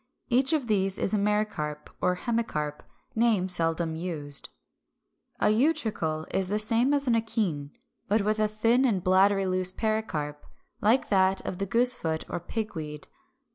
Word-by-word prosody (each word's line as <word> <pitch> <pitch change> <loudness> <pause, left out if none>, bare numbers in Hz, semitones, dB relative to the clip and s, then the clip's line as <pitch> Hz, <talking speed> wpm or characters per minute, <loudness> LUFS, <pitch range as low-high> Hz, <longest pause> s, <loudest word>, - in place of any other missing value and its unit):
Each 260 +3 +3
of 305 -5 0
these 195 -3 +1
is 200 - -2
a - - +3
Mericarp 205 -8 -2
or 180 0 +1
Hemicarp, 180 -10 -3 0.3
names 215 -6 +4
seldom 165 -1 0
used. 155 -4 -2 0.9
362. 260 +6 +2
=A - - 0
Utricle= 155 -1 -3
is 190 -1 0
the 205 +3 -1
same 230 +5 +2
as 285 -1 +1
an 245 - +2
akene, 210 -11 -1 0.4
but 205 +1 +1
with 215 +1 0
a 215 - +2
thin 225 +4 +1
and 205 -9 +1
bladdery 195 +1 +3
loose 185 0 +2
pericarp; 185 -10 -3 0.4
like 230 +5 +2
that 190 -1 +2
of 180 - -5
the 195 - -2
Goosefoot 230 -9 +3
or - - -3
Pigweed 160 -7 -6
(Fig. - - -34
200 Hz, 160 wpm, -27 LUFS, 170-225 Hz, 0.9 s, names